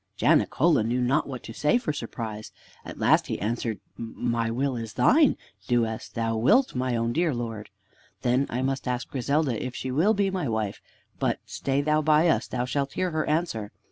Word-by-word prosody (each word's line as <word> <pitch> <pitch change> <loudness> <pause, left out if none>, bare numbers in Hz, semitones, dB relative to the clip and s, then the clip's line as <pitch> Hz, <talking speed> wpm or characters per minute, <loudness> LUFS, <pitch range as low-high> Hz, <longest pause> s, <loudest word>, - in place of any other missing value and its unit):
Janicola 155 -5 +3
knew 120 +3 0
not 130 +5 +1
what 130 -3 -6
to 115 - -8
say 150 - +2
for 155 -11 -2
surprise. 110 -5 -6 0.3
At - - -9
last - - +3
he - - -3
answered, 115 +1 -2 0.2
"My 115 0 -2
will 130 +3 -1
is 115 -2 -5
thine! 270 - +4 0.3
Do 120 -2 +3
as 110 0 -5
thou 115 -1 -2
wilt, 225 - +4
my 125 -1 -1
own 115 0 0
dear 165 -3 +1
Lord!" 115 -3 -5 0.5
"Then 125 +3 +2 0.2
must 135 0 -2
I 125 - +1
ask 125 - -5
Griselda 140 -2 0
if 125 -1 -5
she 130 - -4
will 175 +12 +3
be 200 -1 +1
my 180 -8 -2
wife; 110 -3 -2 0.4
but - - 0
stay 135 +1 -1
thou 150 +1 +2
by 155 +2 +4
us. - - +1
Thou 125 -1 -2
shalt 140 +1 -2
hear 185 -1 -1
her 155 -1 -1
answer." 150 -10 -1
125 Hz, 195 wpm, -26 LUFS, 115-150 Hz, 0.5 s, thine